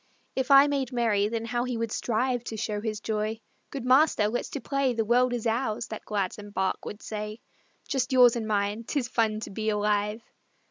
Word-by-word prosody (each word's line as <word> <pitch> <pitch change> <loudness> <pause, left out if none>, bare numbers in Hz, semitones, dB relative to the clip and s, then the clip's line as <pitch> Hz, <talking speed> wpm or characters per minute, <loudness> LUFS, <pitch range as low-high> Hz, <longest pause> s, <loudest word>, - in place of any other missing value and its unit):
If 260 0 -1
I 275 0 +9
made 275 -3 -1
merry 225 -5 +2
then 230 +1 -3
how 240 +1 -1
he 250 -2 -3
would 230 -1 -2
strive 245 +2 0
To 220 - -5
show 210 -1 -2
his 215 -1 -3
joy; 215 0 -2 0.3
"Good 270 -3 -6
master, 255 -5 +4
let's 245 - -3
to 285 - -4
play, 275 -2 0
The 225 -1 0
world 245 +2 +3
is 245 -2 -3
ours," 230 0 0
that 220 - -7
gladsome 205 0 -3
bark 190 -2 -2
would 210 - -7
say; 210 0 -5 0.5
"Just 260 -1 -1
yours 250 -2 +6
and 225 -2 -3
mine 205 +1 0
'tis 255 +1 -2
fun 220 -3 0
to - - -6
be 220 +2 -2
alive!" 210 +1 0
225 Hz, 200 wpm, -27 LUFS, 210-250 Hz, 0.5 s, I